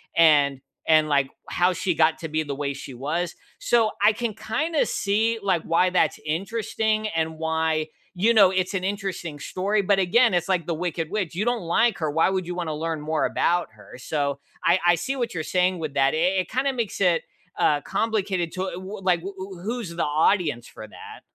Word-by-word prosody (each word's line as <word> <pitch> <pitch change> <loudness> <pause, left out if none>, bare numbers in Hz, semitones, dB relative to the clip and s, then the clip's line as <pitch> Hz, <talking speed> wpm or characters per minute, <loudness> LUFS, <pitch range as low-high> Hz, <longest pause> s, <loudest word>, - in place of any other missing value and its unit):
and 145 -5 +4 0.3
and 155 -1 +5
like 140 -2 +2 0.2
how 180 +1 +2
she 180 +1 -1
got 160 0 +3
to 165 - -5
be 155 +1 0
the 145 -2 -5
way 140 0 -2
she 135 -1 -9
was. 155 +7 -3 0.2
So, 230 -2 +2
I 210 +2 +6
can 230 0 -3
kinda 300 +9 0
see 220 +3 0
like 185 -5 +1
why 170 +2 +2
that's 180 - +2
interesting 215 +5 -1
and 160 -3 -2
why, 160 -1 0 0.3
you 215 +6 +3
know, 200 -4 +6
it's 185 +1 -1
an 190 -2 -2
interesting 190 -6 -4
story, 200 +7 -1
but 195 0 +2
again, 225 +5 +4
it's 175 +1 0
like 180 -4 +1
the 170 - 0
wicked 165 -1 -3
witch. 195 -6 -2
You 205 +5 -1
don't 240 -1 0
like 195 +6 +1
her, 155 -2 -1
why 160 +4 +3
would 190 -2 -2
you 180 - -4
want 175 -2 -3
to - - -2
learn 160 +1 -3
more 155 +1 0
about 175 -4 +1
her? 110 +3 -14
So, 140 +1 -2 0.2
I 170 +2 +4
I 175 0 +6
see 220 +12 -3
what 240 -3 -2
you're 160 -3 -3
saying 180 +1 +1
with 155 -3 -4
that. 135 0 +3
I - - 0 0.2
it 180 - -9
kinda 270 +2 0
makes 235 -5 -3
it, 175 -3 +3 0.4
uh, 145 -1 +3
complicated 195 -4 -1
to 185 0 -3
w 175 - -7
w 195 +2 -7
like 180 -2 +3
w 195 +4 -7
w 190 0 -8
w - - -12
who's 225 -3 -4
the 170 - 0
audience 150 -4 +1
for 110 -1 -11
that? - - -12
175 Hz, 215 wpm, -24 LUFS, 155-200 Hz, 0.4 s, I